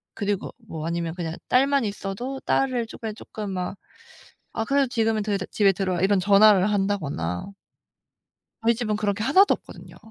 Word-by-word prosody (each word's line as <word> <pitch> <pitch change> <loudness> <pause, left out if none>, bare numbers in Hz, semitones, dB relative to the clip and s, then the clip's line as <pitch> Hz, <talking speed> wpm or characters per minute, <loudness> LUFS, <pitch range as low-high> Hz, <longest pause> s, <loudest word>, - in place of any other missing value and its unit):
그리고 205 -2 -2
뭐 165 -9 -7
아니면 170 -1 -2
그냥 170 -2 -4
딸만 275 +1 +3
있어도 205 +6 -4
딸을 255 -3 0
조께 220 -1 -6
쪼끔 210 -1 -7
막 185 +1 -3 0.8
아 225 - -2
그래도 275 +2 +2
지금은 225 -3 0
더 210 0 -2
이제 195 -1 -1
"집에 205 -2 +4
들어와." 185 -2 -1
이런 195 +1 +3
전화를 200 +1 +5
한다거나 150 - -1 1.2
저희 235 +1 +4
집은 215 -3 -1
그런 205 -1 0
게 210 +1 -3
하나도 375 - +5
없거든요. - - -13
205 Hz, 350 characters per minute, -24 LUFS, 190-230 Hz, 1.2 s, 전화를